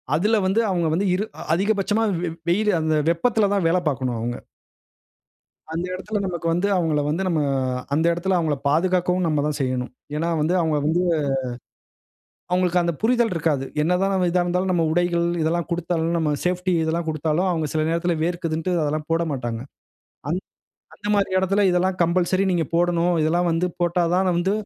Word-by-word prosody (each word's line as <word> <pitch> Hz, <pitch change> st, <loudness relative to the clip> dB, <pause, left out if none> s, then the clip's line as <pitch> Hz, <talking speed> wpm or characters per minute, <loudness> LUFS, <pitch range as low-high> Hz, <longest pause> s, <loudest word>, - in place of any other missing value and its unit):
அதுல 210 Hz, +8 st, +2 dB
வந்து 190 Hz, +4 st, +2 dB
அவங்க 175 Hz, -3 st, 0 dB
வந்து 190 Hz, +5 st, 0 dB
இரு 195 Hz, +4 st, 0 dB, 0.3 s
அதிகபட்சமா 205 Hz, +3 st, +1 dB, 0.2 s
வெ 175 Hz, -, -1 dB, 0.2 s
வெயிலு 210 Hz, +4 st, +2 dB
அந்த 155 Hz, 0 st, +1 dB
வெப்பத்ல 205 Hz, +5 st, +2 dB
தான், 195 Hz, -4 st, +1 dB
வேல 175 Hz, +2 st, +3 dB
பார்க்கணும் 130 Hz, -4 st, -1 dB
அவங்க. 120 Hz, +2 st, -3 dB, 1.4 s
அந்த 165 Hz, +2 st, -2 dB
எடத்துல 210 Hz, +3 st, -3 dB
நமக்கு 175 Hz, -3 st, -4 dB
வந்து 180 Hz, +4 st, +1 dB
அவங்கள 160 Hz, -4 st, +1 dB
வந்து, 165 Hz, +5 st, -1 dB
நம்ம 165 Hz, -3 st, +1 dB, 0.5 s
அந்த 160 Hz, +3 st, +1 dB
எடத்துல 180 Hz, +2 st, 0 dB
அவங்கள 155 Hz, -4 st, 0 dB
பாதுகாக்கவும் 180 Hz, +3 st, +1 dB
நம்ம 150 Hz, -3 st, +1 dB
தான் 150 Hz, -1 st, -2 dB
செய்யணும். 130 Hz, -1 st, -1 dB, 0.3 s
ஏன்னா 165 Hz, +2 st, -1 dB
வந்து 160 Hz, +4 st, +1 dB
அவங்க 160 Hz, -2 st, +1 dB
வந்து, 165 Hz, +3 st, +2 dB, 1.5 s
அவங்களுக்கு 180 Hz, 0 st, +2 dB
அந்த 170 Hz, 0 st, 0 dB
புரிதல் 235 Hz, -1 st, +2 dB
இருக்காது. 150 Hz, -4 st, 0 dB, 0.2 s
என்னதான் 180 Hz, +4 st, +1 dB
நம்ம 185 Hz, -2 st, +2 dB
இதா 180 Hz, +1 st, +2 dB
இருந்தாலும், 180 Hz, +2 st, 0 dB
நம்ம 170 Hz, -2 st, +2 dB
உடைகள் 175 Hz, 0 st, +1 dB, 0.2 s
இதெல்லாம் 170 Hz, +2 st, 0 dB
குடுத்தாலும் 170 Hz, -1 st, -1 dB
நம்ம 155 Hz, -2 st, 0 dB
சேஃப்டி 180 Hz, +1 st, 0 dB
இதெல்லாம் 165 Hz, +1 st, -1 dB
குடுத்தாலோ, 155 Hz, +3 st, 0 dB
அவங்க 160 Hz, -3 st, -1 dB
சில 155 Hz, 0 st, +1 dB
நேரத்துல 170 Hz, +1 st, 0 dB
வேர்க்குதுதுன்னுன்டு, 170 Hz, 0 st, -1 dB
அதெல்லாம் 150 Hz, +1 st, -2 dB
போடமாட்டாங்க. 135 Hz, -9 st, -1 dB, 0.7 s
அந் 180 Hz, +3 st, -1 dB, 0.5 s
அந்த 205 Hz, -, -7 dB
மாரி 200 Hz, -1 st, +1 dB
எடத்ல 195 Hz, +2 st, +1 dB
இதெல்லாம் 180 Hz, +1 st, +1 dB
கம்பல்சரி 180 Hz, +2 st, +1 dB
நீங்க 175 Hz, -3 st, +1 dB
போடனும். 175 Hz, 0 st, +2 dB
இதெல்லாம் 175 Hz, +3 st, +1 dB
வந்து 165 Hz, +2 st, +1 dB
போட்டா 175 Hz, +1 st, +1 dB
தான் 185 Hz, +1 st, +2 dB
வந்து 180 Hz, +3 st, +1 dB
175 Hz, 165 wpm, -23 LUFS, 160-185 Hz, 1.5 s, வேல